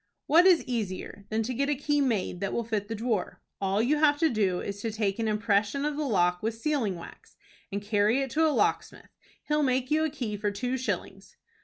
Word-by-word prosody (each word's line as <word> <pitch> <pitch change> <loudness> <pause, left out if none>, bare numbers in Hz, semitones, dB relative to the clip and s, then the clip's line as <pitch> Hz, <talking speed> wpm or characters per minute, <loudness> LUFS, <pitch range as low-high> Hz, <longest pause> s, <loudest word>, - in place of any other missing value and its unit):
"What 340 +5 +6
is 360 -3 +5
easier 205 -4 -4
than 220 +1 0
to 250 +4 -3
get 280 +4 0
a 295 - +2
key 290 +1 0
made 215 -9 0
that 195 - -2
will 235 - -1
fit 215 -3 -2
the 225 - -4
drawer? 225 -3 -2 0.2
All 195 +2 +1
you'll 295 +5 +2
have 295 -1 +4
to 320 - +4
do 195 -5 +1
is 200 0 -5
to 225 - -2
take 210 -1 -1
an 225 - 0
impression 210 +5 +1
of 300 -1 -1
the 300 -1 -2
lock 180 -5 +2
with 225 +1 -2
sealing 235 -7 0
wax, 170 - -12 0.3
and 200 +1 -3
carry 210 +3 +2
it 270 - -6
to 320 +1 +3
a - - +3
locksmith. 300 - -1 0.3
He'll 300 0 +1
make 260 -1 0
you 310 +1 +3
a 315 - +1
key 240 -8 -4
for 205 0 -1
two 245 +5 -2
shillings." 260 0 -5
230 Hz, 225 wpm, -28 LUFS, 205-285 Hz, 0.3 s, What